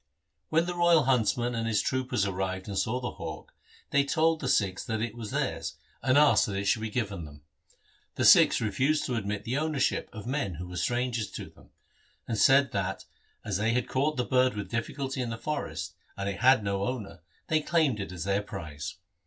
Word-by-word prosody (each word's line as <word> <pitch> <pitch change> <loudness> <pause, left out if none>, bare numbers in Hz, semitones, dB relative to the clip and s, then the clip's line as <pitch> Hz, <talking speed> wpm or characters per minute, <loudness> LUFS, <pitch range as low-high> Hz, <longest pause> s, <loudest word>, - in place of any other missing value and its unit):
When 165 +2 +3
the 175 - -3
royal 175 -3 +4
huntsman 120 -1 +1
and 115 -1 -2
his 110 -3 +2
troopers 130 -5 0
arrived 95 -1 -3
and 100 - -4
saw 110 +6 0
the 125 - -4
hawk, - - -8 0.4
they 140 0 +4
told 160 +2 +2
the 135 - -3
Sikhs 95 -2 +1
that 110 -3 -2
it 115 0 -2
was 115 -3 -7
theirs, - - -2 0.3
and 130 +2 +3
asked 150 0 +5
that 100 - -3
it 100 +1 -2
should 110 +2 +2
be 110 - -3
given 105 -6 -3
them. 75 -1 -12 0.7
The - - 0
Sikhs - - +7
refused 135 +8 +1
to 125 - -2
admit 105 -2 -3
the 125 +6 -1
ownership 155 -3 0
of 110 -3 -9
men 125 - -2
who 90 +2 -7
were 90 0 -7
strangers 120 +3 -1
to - - -7
them, - - -20 0.6
and 115 - -1
said 135 +1 +5
that, 95 -1 -2 0.4
as 105 -4 -1
they 110 +3 +1
had 125 0 0
caught 145 +3 0
the 125 - 0
bird 130 -1 +2
with 100 -3 -5
difficulty 135 +3 -3
in 120 - -2
the 115 - -4
forest, 150 +5 -4 0.2
and 100 0 -3
it 100 - -3
had 125 -2 +5
no 100 -1 -1
owner, 110 -9 -5 0.2
they 155 -1 +1
claimed 150 -8 +1
it 100 -1 -5
as 90 -3 -5
their 100 +1 +1
prize. 80 -8 -7
115 Hz, 210 wpm, -28 LUFS, 100-130 Hz, 0.7 s, Sikhs